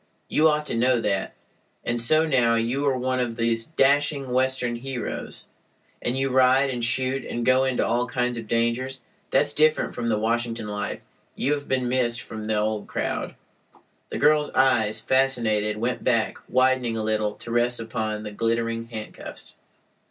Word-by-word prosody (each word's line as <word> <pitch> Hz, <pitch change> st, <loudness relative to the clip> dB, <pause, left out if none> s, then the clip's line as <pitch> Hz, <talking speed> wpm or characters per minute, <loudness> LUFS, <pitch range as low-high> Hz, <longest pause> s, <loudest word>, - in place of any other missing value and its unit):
You 155 Hz, -, +4 dB
ought 150 Hz, 0 st, 0 dB
to 145 Hz, -, -3 dB
know 125 Hz, +1 st, +3 dB
that. 100 Hz, -3 st, -1 dB, 0.5 s
And 120 Hz, 0 st, -1 dB
so 155 Hz, +7 st, +4 dB
now 125 Hz, -6 st, +3 dB
you 120 Hz, +5 st, 0 dB
are 135 Hz, -2 st, +2 dB
one 130 Hz, 0 st, -1 dB
of 120 Hz, -2 st, -1 dB
these 115 Hz, -1 st, 0 dB
dashing 145 Hz, -2 st, +2 dB
Western 130 Hz, -2 st, 0 dB
heroes, 130 Hz, -1 st, -5 dB, 0.6 s
and 125 Hz, +2 st, -1 dB
you 135 Hz, 0 st, 0 dB
ride 130 Hz, +1 st, +4 dB
and 120 Hz, -2 st, -3 dB
shoot 130 Hz, +3 st, +1 dB
and 120 Hz, 0 st, -4 dB
go 130 Hz, +1 st, +4 dB
into 130 Hz, -2 st, +1 dB
all 120 Hz, +2 st, 0 dB
kinds 125 Hz, 0 st, -1 dB
of 115 Hz, -2 st, -6 dB
dangers. 120 Hz, +3 st, -1 dB, 0.3 s
That's -, -, +2 dB
different 155 Hz, 0 st, +2 dB
from 115 Hz, -, -3 dB
the 110 Hz, -2 st, +1 dB
Washington 115 Hz, 0 st, -1 dB
life. 105 Hz, -1 st, -4 dB, 0.3 s
You 145 Hz, -, +1 dB
have 145 Hz, -1 st, -4 dB
been 130 Hz, -1 st, 0 dB
missed 120 Hz, -1 st, +1 dB
from 110 Hz, -2 st, -7 dB
the 110 Hz, 0 st, 0 dB
old 105 Hz, 0 st, -1 dB
crowd." -, -, -3 dB, 0.7 s
The -, -, -4 dB
girl's 150 Hz, 0 st, +3 dB
eyes, 110 Hz, -5 st, +3 dB
fascinated, 110 Hz, -5 st, +1 dB
went 120 Hz, +3 st, -2 dB
back, 115 Hz, -3 st, +1 dB
widening 130 Hz, -2 st, +2 dB
a 110 Hz, -, -2 dB
little, 110 Hz, -1 st, 0 dB
to 120 Hz, -, -9 dB
rest 120 Hz, +1 st, +2 dB
upon 110 Hz, -2 st, -3 dB
the 105 Hz, -, -6 dB
glittering 115 Hz, +1 st, -1 dB
handcuffs. 110 Hz, -2 st, -9 dB
120 Hz, 170 wpm, -24 LUFS, 115-130 Hz, 0.7 s, You